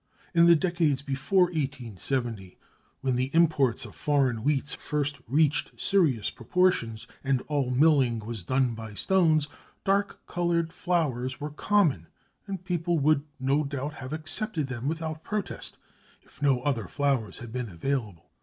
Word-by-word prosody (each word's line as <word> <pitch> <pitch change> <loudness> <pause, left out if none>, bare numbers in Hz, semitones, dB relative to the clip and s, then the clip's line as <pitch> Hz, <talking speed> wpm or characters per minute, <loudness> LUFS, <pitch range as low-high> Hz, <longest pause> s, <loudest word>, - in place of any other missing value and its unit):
In 170 0 +6
the 170 - +8
decades 160 -5 +1
before 140 +7 +2
1870 125 - -3 0.4
when 130 -2 +1
the 130 +1 0
imports 150 -8 +3
of - - -11
foreign 140 -5 +1
wheats 145 +4 0
first 145 -1 -2
reached 150 +4 +1
serious 155 - +2
proportions, 120 -6 +1 0.2
and 135 -2 +1
all 145 -4 -1
milling 135 -3 +4
was 110 -2 -6
done 130 +4 +1
by 110 -2 -8
stones, 160 - +3 0.4
dark 200 +1 0
coloured 170 -1 0
flours 145 -9 -1
were 150 +1 -4
common, 150 - +2 0.4
and 190 -2 -5
people 175 -1 0
would 150 0 +3 0.2
no 135 +3 +2
doubt 140 +1 -4
have 130 -3 -8
accepted 155 +2 -2
them 130 -1 -4
without 160 0 -3
protest, 210 -3 -4 0.5
if - - -23
no 135 -3 +3
other 125 -7 -1
flours 135 -8 0
had 115 -1 -9
been 125 -3 -3
available. 100 -2 -3
140 Hz, 145 wpm, -27 LUFS, 125-165 Hz, 0.5 s, the